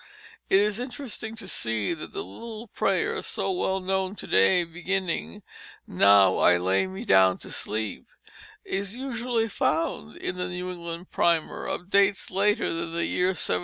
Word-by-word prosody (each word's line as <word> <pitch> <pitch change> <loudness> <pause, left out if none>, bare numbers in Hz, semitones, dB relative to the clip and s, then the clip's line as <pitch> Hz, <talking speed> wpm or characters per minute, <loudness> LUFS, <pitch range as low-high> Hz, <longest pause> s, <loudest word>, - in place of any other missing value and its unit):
It 190 - +5
is 210 +1 +1
interesting 245 -3 -6
to 220 -4 -8
see 115 - -1
that 160 - -8
the 395 - -4
little 230 - -9
prayer - - 0
so - - -2
well 195 - 0
known 190 +1 -1
to - - -7
day, 95 - +4
beginning 170 - -3 0.4
"Now 100 0 +5
I 90 - +5
lay 95 +2 +1
me 95 0 -7
down 95 -1 +5
to - - -9
sleep," 110 0 -4 0.6
is 200 +3 -3
usually 240 -3 -1
found 155 - -1
in 180 - -4
the 180 0 -2
New 180 0 -4
England 170 0 -7
Primer 170 -2 +1
of 180 +3 -5
dates 200 0 +3
later 205 +2 +2
than 165 0 -4
the 170 0 0
year 180 - +1
1737. 180 - 0
180 Hz, 165 wpm, -26 LUFS, -, 0.6 s, It